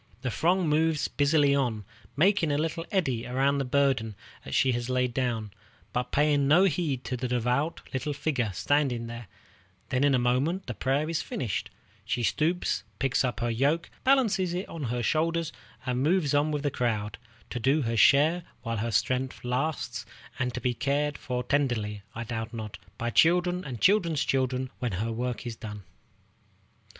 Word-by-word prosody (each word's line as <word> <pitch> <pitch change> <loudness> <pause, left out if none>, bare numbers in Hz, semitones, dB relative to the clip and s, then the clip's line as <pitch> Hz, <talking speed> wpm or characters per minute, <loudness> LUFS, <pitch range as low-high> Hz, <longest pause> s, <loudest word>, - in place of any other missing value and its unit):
The 125 - -1
throng 175 - +2
moves 155 0 +2
busily 145 -1 +3
on, 120 -7 0 0.3
making 180 -1 +3
a 145 - +1
little 165 +2 -2
eddy 135 - 0
around 135 +3 +1
the - - +1
burden 130 -5 +1 0.3
she 130 - +3
has 120 0 -2
laid 125 -1 +1
down, 115 -5 -1 0.4
but 125 0 -2
paying 145 -1 +3
no 165 +6 +6
heed 155 -8 0
to 120 +2 -3
the 125 +1 -3
devout 125 +6 0
little 135 +3 -2
figure 140 -5 -1
standing 125 - +1
there; 115 -1 -7 0.6
then 130 0 +1
in 140 -2 +4
a - - +4
moment 130 +10 +1
the 120 - -4
prayer 135 +6 0
is 165 0 -1
finished; 115 -7 -3 0.3
she 120 0 -2
stoops, 165 +9 +1 0.2
picks 135 -1 +1
up 125 -2 -2
her 120 0 0
yoke, 145 +8 +1
balances 210 -10 +3
it 185 - -3
on 160 -4 -5
her 120 0 -2
shoulders, 165 +3 0 0.3
and 125 0 0
moves 155 -1 +2
on 145 +2 +3
with 150 -1 -2
the 145 - 0
crowd, 105 -5 -2 0.3
to 120 - -3
do 135 +5 +2
her 115 -1 -1
share 150 +9 +5 0.2
while 115 -1 -2
her 115 +3 -1
strength 130 +4 0
lasts, 125 -2 -2 0.3
and 125 -1 0
to - - -2
be 125 -1 0
cared 140 +4 0
for 125 -2 -3
tenderly, 120 -7 0
I 115 - -3
doubt 115 0 -5
not, 110 -2 -6 0.2
by 120 0 -2
children 180 +5 +3
and 125 -7 -6
children's 170 - +3
children 130 -1 0
when 125 -5 -2
her 110 +6 -2
work 125 +2 -3
is 120 -2 -4
done. 105 -3 -8
130 Hz, 175 wpm, -28 LUFS, 120-155 Hz, 0.6 s, no